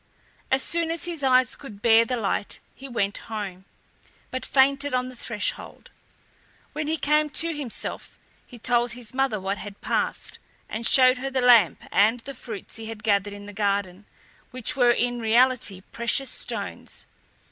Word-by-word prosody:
As 265 0 +2
soon 335 -1 -1
as 335 +1 -2
his 340 -4 -3
eyes 255 -1 +3
could 225 -8 -11
bear 230 0 +6
the 250 +2 -2
light 205 -2 -2 0.2
he 270 +1 -11
went 205 -4 -1
home, 195 -4 -5 0.7
but 255 - -4
fainted 275 0 +2
on 250 0 -1
the 255 - -11
threshold. 230 -3 -5 0.8
When 305 0 -3
he 320 +1 0
came 300 0 +2
to 330 +2 +2
himself 280 -6 -5 0.3
he 245 - -12
told 240 0 +1
his 240 -2 -7
mother 265 -5 0
what 195 +1 -3
had 205 -1 -9
passed, - - -2 0.3
and 225 +2 -2
showed 255 -1 +6
her 270 +1 -3
the 265 -1 -1
lamp 235 - +5
and 215 +5 +4
the 275 +3 -8
fruits 225 -6 -8
he 225 -1 -7
had 220 -1 -8
gathered 205 -1 +1
in 205 0 -9
the 205 - -9
garden, 200 -1 -1 0.4
which 255 +4 -2
were 245 -3 +4
in 245 0 +1
reality 235 -3 +2
precious 235 +3 -1
stones. - - -5
240 Hz, 170 wpm, -25 LUFS, 210-270 Hz, 0.8 s, bear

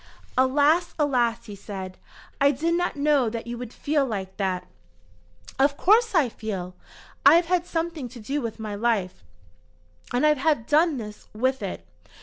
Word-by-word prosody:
"Alas! 290 +7 +3
alas!" 250 -6 +1
he 205 - -8
said. 190 -2 -8 0.4
"I 280 - +6
did 310 +5 0
not 355 -1 0
know 285 -4 +2
that 230 0 -5
you 235 0 -5
would 245 -2 -7
feel 290 +2 0
like 195 -6 -4
that." 190 -3 -1 0.9
"Of 280 +1 +3
course 450 +2 +4
I 310 -6 +4
feel. 195 -6 -5 0.5
I - - +8
have 340 +1 +4
had 355 0 0
something 325 -6 -3
to 245 0 -11
do 275 +7 -3
with 230 -2 -5
my 215 -1 -5
life, 205 - -1 0.9
and 245 +4 +2
I 300 - +6
have 290 -4 0
done 310 +1 +3
this 210 -3 -8
with 260 +4 0
it! 185 - -5
260 Hz, 165 wpm, -25 LUFS, 215-305 Hz, 0.9 s, I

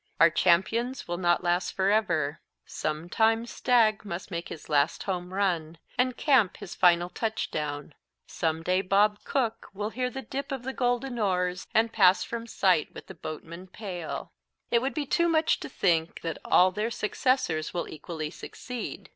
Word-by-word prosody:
Our 165 0 +7
champions 225 +11 +2
will 175 0 -3
not 175 -1 +2
last 175 +1 0
forever. 190 -7 +1 0.2
Some 155 +2 -3
time 225 +4 +2
Stagg 235 -3 +2
must 185 -1 -6
make 170 -1 -4
his 155 - -9
last 150 +1 +1
home 180 -2 -3
run, 175 -5 -1 0.2
and 250 0 +1
Camp 255 -10 +3
his 175 - -8
final 175 -1 +4
touchdown. 150 -9 -3 0.3
Some 160 -1 -2
day 185 +2 +2
Bob 205 +2 +2
Cook 230 -4 -1
will 210 +2 -3
'hear 250 +1 -1
the 265 +1 -6
dip 275 +1 -5
of 265 -2 -4
the 265 +1 -4
golden 245 0 -1
oars' 180 -3 0
and 225 +1 +3
'pass 190 -3 +5
from 235 0 -5
sight 185 -8 +2
with - - -9
the - - -10
boatman 165 +3 -8
pale.' 180 -4 -6 0.4
"It 235 - +4
would 265 +2 -2
be 300 -2 -1
too 340 +5 +2
much 315 -1 +2
to - - -7
think 170 -8 0
that 165 -1 -4
all 185 +1 +5
their 210 +4 -2
successors 210 - 0
will 175 - -3
equally 155 0 -6
succeed. 250 +6 -7
190 Hz, 170 wpm, -28 LUFS, 170-235 Hz, 0.4 s, Our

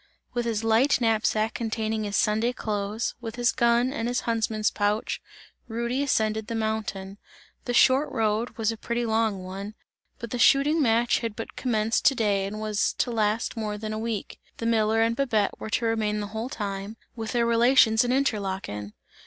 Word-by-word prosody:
With 240 -1 -1
his 225 -2 -1
light 225 +6 +3
knapsack 220 -1 +1
containing 220 -1 -2
his 205 0 -3
Sunday 220 +3 +2
clothes, 210 0 -2
with 225 -1 -6
his 245 0 +2
gun 235 +2 +2
and 230 -5 -2
his 245 +1 0
huntsman's 220 -2 0
pouch, 205 +1 -1 0.5
Rudy 235 +3 -2
ascended 220 -5 0
the 230 - -3
mountain. 210 -3 -3 0.5
The 245 - -1
short 265 +4 +5
road, 225 0 -1
was 225 -1 +1
a 225 - -6
pretty 235 +2 -2
long 220 -4 0
one, 195 +3 -7 0.4
but 235 - -8
the 245 - -3
shooting 290 +6 +4
match 235 -2 +3
had 230 -3 -4
but 225 - -7
commenced 225 -3 0
to 275 - +5
day 200 -4 +1
and 210 +2 -6
was 215 -1 0
to 245 - -1
last 220 0 0
more 215 -2 -3
than 215 0 -5
a 215 - -3
week; 225 -3 -4 0.2
the 230 - -5
miller 225 -1 +3
and 230 0 +1
Babette 230 -6 0
were - - -6
to 230 - 0
remain 215 -2 0
the 205 - -3
whole 225 +3 -3
time, 200 -1 -5 0.2
with 225 -1 -5
their 235 -1 +2
relations 235 -1 +5
in 245 - -1
Interlaken. 190 - -2
225 Hz, 185 wpm, -26 LUFS, 215-235 Hz, 0.5 s, short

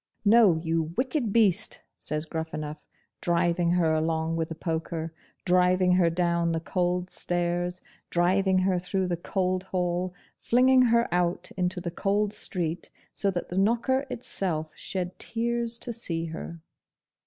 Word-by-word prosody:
'No, 205 -5 +6
you 160 0 -1
wicked 255 -3 0
beast!' 210 -5 +3 0.2
says 150 +1 -2
Gruffanuff, 155 -2 -5 0.3
driving 170 0 +1
her 170 -2 +2
along 160 +1 0
with 165 -1 -2
the 160 - -5
poker 160 0 -3 0.3
driving 180 0 +3
her 180 -2 +4
down 170 0 +1
the 165 - 0
cold 180 +1 -1
stairs 175 +1 -2 0.3
driving 185 +2 +2
her 185 -1 +2
through 185 +1 -1
the 175 - 0
cold 185 +1 -1
hall 180 -1 -2 0.2
flinging 255 +2 +4
her 235 -1 +3
out 175 -1 0
into 180 0 -1
the 175 -1 -4
cold 205 +3 0
street, 170 -3 -3 0.2
so 200 - +1
that 180 -2 -3
the 180 - -1
knocker 240 +6 +1
itself 165 -9 -3
shed 180 -1 -4
tears 235 0 -1
to 240 0 0
see 165 -7 -3
her! 165 0 -7
180 Hz, 145 wpm, -27 LUFS, 165-195 Hz, 0.3 s, No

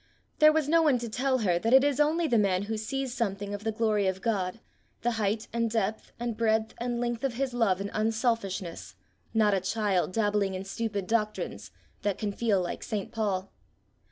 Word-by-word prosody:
There 305 0 +8
was 310 -2 +1
no 330 +2 +4
one 295 -5 +4
to 235 -1 -4
tell 260 +4 +1
her 175 -2 +3
that 230 +7 +4
it 265 - +7
is 285 -1 +1
only 315 +3 +3
the 235 -6 +3
man 195 -2 +2
who 220 +2 -3
sees 255 +4 -3
something 205 -4 -2
of 205 0 -5
the 220 - 0
glory 215 -3 +1
of 190 0 -1
God, 195 -2 -1 0.4
the 240 - +2
height 215 -1 -1
and 230 -1 +1
depth 220 -1 -2
and 235 -1 -2
breadth 220 0 +1
and 240 0 -2
length 240 0 -2
of 265 -3 -1
his 265 0 -1
love 220 -6 +2
and 200 0 -4
unselfishness, 215 -5 -1 0.4
not 215 -2 +3
a 195 - +3
child 195 -2 0
dabbling 205 -3 +1
in 185 - -4
stupid 205 -1 -3
doctrines, 215 0 -2 0.3
that 205 -2 0
can 210 -2 -2
feel 205 -1 +1
like 175 -1 -3
St. 205 -3 -4
Paul. 200 -4 -2
220 Hz, 200 wpm, -28 LUFS, 200-240 Hz, 0.4 s, There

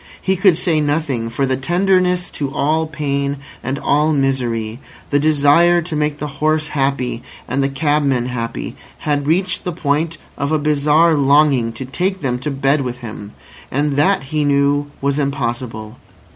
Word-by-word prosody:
He 190 - 0
could 185 -3 +4
say 165 -4 +2
nothing; 145 -6 -1
for 125 +4 -1
the 130 0 0
tenderness 180 +4 +1
to 140 -2 -4
all 155 +3 0
pain 140 -2 -2 0.3
and 135 +1 -2
all 150 +2 +2
misery, 120 -5 -1 0.3
the 145 - +3
desire 155 +4 +4
to 160 -1 -5
make 150 -1 0
the 150 - -4 0.2
horse 155 0 +1
happy 135 -4 -1 0.3
and 135 +3 -1
the 135 - +1
cabman 140 -3 +1
happy, 120 -2 -4 0.3
had 145 -2 0
reached 180 +4 0
the 180 - -2
point 160 0 -1 0.2
of 140 +1 -1
a 155 - +3
bizarre 150 +2 +3
longing 140 -4 +3
to 130 - -6
take 185 +8 -2
them 125 -3 -1
to 130 - -3
bed 140 +1 +1
with 125 -2 -4
him. 105 -2 -8 0.4
And 145 +3 0
that, 185 +7 +2
he 150 +3 -1
knew, 145 0 +2
was 140 +1 0
impossible. 120 -5 -3
145 Hz, 165 wpm, -18 LUFS, 135-155 Hz, 0.4 s, could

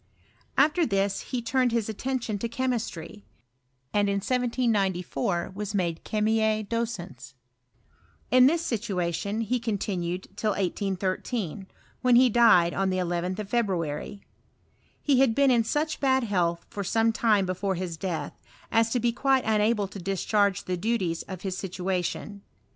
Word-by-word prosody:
After 310 +5 +4
this 195 -6 0
he 250 -3 -2
turned 255 +1 +1
his 230 -2 0
attention 225 -1 -3
to 235 - -3
chemistry; 230 - -3 0.7
and 205 -1 +2
in 200 - +1
1794 200 - 0
was 205 +1 -4
made 170 -4 -1
chemi/B 215 0 +1
docens. 175 - -5 1.0
In 255 +1 +7
this 335 +3 +1
situation 200 -2 -2
he 240 +3 0
continued 190 -5 -3
till 210 -1 0
181^, 195 0 -2 0.3
when 250 -1 +4
he 250 +1 +6
died 210 -7 +5
on 195 0 0
the 185 - 0
11th 180 +1 -1
of 210 -2 -5
February. 190 -5 -2 0.8
He 275 -4 +2
had 260 -4 +4
been 275 -1 +4
ia 235 -2 +4
such 305 +6 -1
bad 265 -2 +2
health 175 -6 0
for 200 - -5
some 225 +4 +2
time 215 -4 +3
before 185 +1 -1
his 175 -2 -4
death, 170 0 -4 0.4
as 225 0 +3
to 250 - +2
be 240 0 +1
quite 265 +2 +2
unable 215 -1 +2
to 200 +1 -9
discharge 195 +2 +1
the 180 -1 -2
duties 185 -4 -1
of 185 -2 -7
his 190 -2 -2
situation. 185 +2 -3
205 Hz, 145 wpm, -27 LUFS, 185-235 Hz, 1.0 s, In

